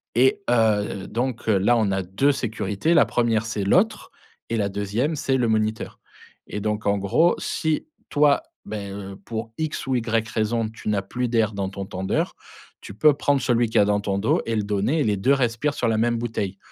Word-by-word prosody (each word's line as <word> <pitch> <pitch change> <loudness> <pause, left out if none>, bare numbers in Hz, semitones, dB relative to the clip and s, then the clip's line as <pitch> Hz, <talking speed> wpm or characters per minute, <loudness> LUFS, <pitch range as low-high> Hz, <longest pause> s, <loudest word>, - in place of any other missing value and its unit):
Et 130 +3 +3
heu, 105 -4 +1
donc 120 0 -3
là, 105 +3 +3
on 110 -3 +1
a 95 0 0
2 95 +11 +2
sécurités: 110 - -1
la - - +6
1re, 115 -2 +1
c'est 110 -2 -3
l'autre 210 - +2 0.4
et 115 - -1
la 100 -1 0
2e, 105 +10 -1
c'est 135 -1 0
le 120 -2 +1
moniteur. 110 0 -1 0.5
Et 105 - -5
donc 105 0 -2
en 100 0 +2
gros, 100 - +3
si 160 - -1 0.2
toi, 145 -1 +3 0.2
ben, 100 -2 -5 0.2
heu, - - -10
pour 115 0 -5
X 155 -3 -3
ou 130 - +1
Y 115 -1 0
raison, 110 0 0
tu 110 - -11
n'as 105 -2 +1
plus 125 +6 -3
d'air 115 -2 +1
dans 100 -1 -2
ton 100 0 -6
tendeur, 95 0 -2 0.5
tu - - -9
peux 150 +6 +5
prendre 145 0 +1
celui 120 -1 +2
qu'il 110 - -11
y - - +7
a 100 - +4
dans 105 0 +2
ton 100 -1 -1
dos 105 +3 +1
et 115 - 0
le 105 - 0
donner 105 +9 0
et - - +3
les 105 -4 +1
2 130 +9 +3
respirent 135 +2 0
sur 120 - 0
la 110 -1 +1
même 120 +1 +1
bouteille. 105 -4 -3
110 Hz, 210 wpm, -23 LUFS, 100-125 Hz, 0.5 s, y